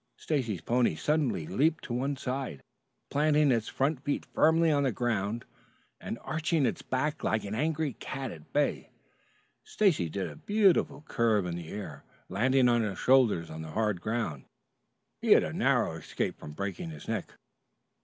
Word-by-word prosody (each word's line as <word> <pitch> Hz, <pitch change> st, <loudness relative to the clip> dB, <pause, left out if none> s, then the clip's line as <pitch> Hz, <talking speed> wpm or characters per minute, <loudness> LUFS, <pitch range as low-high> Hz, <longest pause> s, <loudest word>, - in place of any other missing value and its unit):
Stacy's 120 Hz, -, -2 dB
pony 120 Hz, -7 st, +2 dB
suddenly 120 Hz, -, 0 dB
leaped 155 Hz, -, +1 dB
to 120 Hz, -, -5 dB
one 135 Hz, +3 st, -1 dB
side, 130 Hz, -, -4 dB, 0.5 s
planting 150 Hz, 0 st, +3 dB
its 115 Hz, -3 st, +1 dB
front 135 Hz, 0 st, 0 dB
feet 145 Hz, +1 st, -1 dB
firmly 160 Hz, +1 st, +3 dB
on 145 Hz, -1 st, +3 dB
the 135 Hz, -2 st, +2 dB
ground 110 Hz, -1 st, -1 dB, 0.5 s
and -, -, -5 dB
arching 155 Hz, -2 st, 0 dB
its 120 Hz, -, -1 dB
back 145 Hz, +4 st, -2 dB
like 110 Hz, -, +1 dB
an 100 Hz, -, -5 dB
angry 155 Hz, +3 st, 0 dB
cat 135 Hz, 0 st, -5 dB
at 80 Hz, -2 st, -12 dB
bay. 145 Hz, 0 st, 0 dB, 0.7 s
Stacy 190 Hz, -, +2 dB
did 95 Hz, +2 st, -3 dB
a 75 Hz, -, -9 dB
beautiful 195 Hz, -, +2 dB
curve 110 Hz, -4 st, +2 dB
in 85 Hz, -1 st, -3 dB
the 85 Hz, -2 st, -7 dB
air, 95 Hz, -9 st, -7 dB, 0.3 s
landing 125 Hz, +6 st, +3 dB
on 120 Hz, -1 st, +3 dB
his 105 Hz, -4 st, -2 dB
shoulders 120 Hz, -11 st, +3 dB
on 80 Hz, 0 st, -6 dB
the 80 Hz, -1 st, -8 dB
hard 105 Hz, -5 st, 0 dB
ground. 110 Hz, -, -2 dB, 0.8 s
He -, -, +6 dB
had -, -, +5 dB
a -, -, -4 dB
narrow -, -, +2 dB
escape -, -, -3 dB
from 75 Hz, -, -9 dB
breaking 95 Hz, -1 st, -4 dB
his 75 Hz, -2 st, -10 dB
neck. -, -, -3 dB
120 Hz, 165 wpm, -29 LUFS, 100-145 Hz, 0.8 s, He